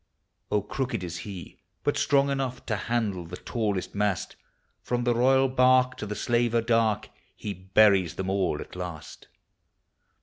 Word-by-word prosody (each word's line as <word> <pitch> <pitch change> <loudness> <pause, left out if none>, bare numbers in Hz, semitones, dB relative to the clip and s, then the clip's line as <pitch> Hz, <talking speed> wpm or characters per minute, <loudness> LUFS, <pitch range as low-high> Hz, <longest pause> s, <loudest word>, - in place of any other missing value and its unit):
Oh, 105 -2 +1
crooked 120 -2 -3
is 85 -1 -5
he, 90 -5 -9 0.2
but - - +1
strong 140 0 +3
enough 135 -2 -3
To 110 - -1
handle 105 -3 -1
the 85 +2 -8
tallest 105 -6 -2
mast; 100 -6 -1 0.5
From 120 0 -1
the 120 0 +2
royal 130 +3 +4
barque 130 0 +4
to 105 - -5
the 105 - -4
slaver 120 0 +1
dark, 115 -2 +1 0.3
He 105 - -5
buries 95 -1 +3
them 95 - -3
all 95 -5 0
at - - -10
last. 90 -4 -8
110 Hz, 155 wpm, -27 LUFS, 95-125 Hz, 0.5 s, royal